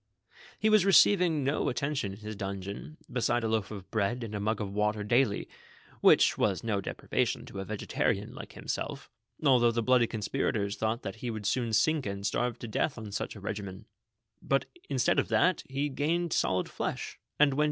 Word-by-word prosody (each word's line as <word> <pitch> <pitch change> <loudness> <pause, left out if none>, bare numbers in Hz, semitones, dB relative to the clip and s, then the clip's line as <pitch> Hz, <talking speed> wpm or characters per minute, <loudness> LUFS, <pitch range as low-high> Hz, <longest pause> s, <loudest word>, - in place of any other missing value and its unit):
lie 215 - +5
was 215 -3 +6
receiving 180 -5 +5
no 140 +3 +1
attention 130 -4 -1
in - - -10
his 105 0 -6
dungeon 100 +8 -6
beside 120 -1 +1
a - - +1
loaf 110 -3 0
of 100 -3 -8
bread 115 +3 0
and 110 -2 -6
a 105 - -2
mug 110 +1 0
of 100 -2 -4
water 105 0 0
daily, 120 0 +2 0.5
which - - +5
was 95 -4 +1
no 105 -4 0
de - - -4
privation - - -1
to 100 - -8
a - - -2
vegetarian, 105 0 -1
like - - -9
himself, - - -5 0.3
although 125 -4 +5
the 115 0 0
bloody 125 -1 +4
conspirators 105 -1 -1
thought 110 +2 -1
that 100 +2 -5
he 120 +2 -4
would 110 -2 -5
soon 115 +2 0
sink 150 +3 +2
and 100 0 -4
starve 120 +3 0
to 120 - -7
death 130 +6 -1
on 110 -3 -7
such 100 - -3
a - - -9
regimen; 100 0 -6 0.6
but, 135 0 +1 0.2
instead - - +2
of - - 0
that, 185 0 +3
he 140 +2 -1
gained 160 +5 0
solid 90 -1 +1
flesh, - - -4 0.2
and 145 -2 +5
when 140 - -2
110 Hz, 195 wpm, -30 LUFS, 100-135 Hz, 0.6 s, was